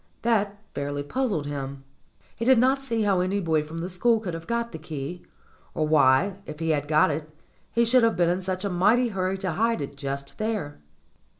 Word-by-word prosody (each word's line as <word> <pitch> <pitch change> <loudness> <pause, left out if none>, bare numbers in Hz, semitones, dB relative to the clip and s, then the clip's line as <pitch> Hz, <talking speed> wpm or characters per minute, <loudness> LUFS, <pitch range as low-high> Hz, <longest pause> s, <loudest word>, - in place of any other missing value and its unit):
That 210 -3 +1 0.2
fairly 145 0 -3
puzzled 205 - -1
him. 140 -1 -5 0.5
He - - -4
did 260 +1 +5
not 260 +3 +3
see 230 -5 -1
how 195 -3 +2
any 185 +3 0
boy 160 -4 +1
from 155 +2 -8
the 165 +2 -3
school 225 +6 +3
could 190 -6 -5
have 165 0 -7
got 235 0 -1
the 160 - -7
key, 155 +2 -6 0.5
or 155 - +1
why 155 +6 +4
if 150 - -7
he 165 +1 -2
had 145 -1 0
got 155 +1 +4
it 150 +1 -4 0.4
he 235 0 +3
should 250 +2 +5
have 230 -1 +3
been 175 -1 +3
in 180 +2 +1
such 185 +1 -3
a - - 0
mighty 225 +8 +3
hurry 190 -2 -1
to 190 -2 -2
hide 230 +5 +1
it 140 0 -5
just 140 +2 -5
there. 215 -9 -2
180 Hz, 210 wpm, -26 LUFS, 150-225 Hz, 0.5 s, did